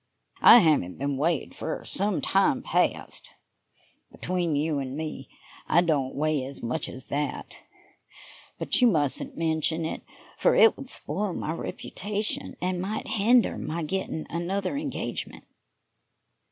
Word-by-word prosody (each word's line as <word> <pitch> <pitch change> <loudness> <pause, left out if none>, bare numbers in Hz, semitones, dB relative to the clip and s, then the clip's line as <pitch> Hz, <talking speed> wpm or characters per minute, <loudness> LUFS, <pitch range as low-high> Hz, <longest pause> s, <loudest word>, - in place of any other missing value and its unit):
I - - +10
haven't 145 - +2
been 140 +1 -1
weighed 160 +1 0
for - - -5
some 200 0 -1
time 255 +7 +2
past. - - -1 0.8
Between 175 -4 -1
you 150 0 0
and 135 0 -4
me, 155 -4 -5 0.4
I 170 - +5
don't 145 -6 0
weigh 150 -1 0
as 135 +2 -7
much 125 +6 -2
as 130 0 -8
that, 145 +1 -3 1.0
but - - 0
you 250 - +7
mustn't 150 - 0
mention 160 0 0
it, 160 - -4 0.4
for - - +4
it 450 - +7
would 270 -2 -9
spoil 190 - -3
my 155 - -3
reputation 205 +5 -4
and 180 0 -1
might 205 +4 -4
hinder 230 +3 +3
my 165 +1 -3
getting 160 -1 -3
another 185 - -2
engagement." 285 -1 -4
165 Hz, 135 wpm, -27 LUFS, 150-195 Hz, 1.0 s, I